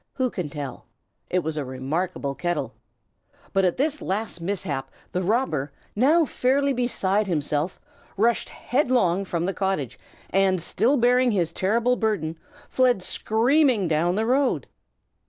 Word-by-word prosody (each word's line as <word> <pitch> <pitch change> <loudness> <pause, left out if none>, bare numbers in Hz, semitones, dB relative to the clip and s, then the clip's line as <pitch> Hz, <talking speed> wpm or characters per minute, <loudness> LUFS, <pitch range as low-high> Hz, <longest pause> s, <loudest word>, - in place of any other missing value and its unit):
Who 255 -3 0
can 175 -6 -4
tell? 140 -3 -7 0.4
It 180 -1 +1
was 155 0 -3
a 150 - -1
remarkable 140 +4 -3
kettle. 175 +4 -2 0.8
But 195 -1 +3
at 180 - +1
this 295 +2 0
last 195 -2 -3
mishap 170 -7 -2 0.2
the 180 - -1
robber, 175 - 0 0.2
now 305 +9 +4
fairly 275 +1 +1
beside 215 -5 0
himself, 150 0 -1 0.4
rushed 230 +3 +2
headlong 240 - +1
from 170 -2 -2
the 195 - -1
cottage, 190 - -2 0.3
and 190 -1 +3
still 225 - +1
bearing 250 +1 +4
his 175 -7 0
terrible 235 +7 +1
burden, 195 -8 -1 0.3
fled 250 -7 +2
screaming 235 - +2
down 165 +3 +1
the 220 +2 0
road. 265 +3 +1
195 Hz, 135 wpm, -24 LUFS, 170-245 Hz, 0.8 s, now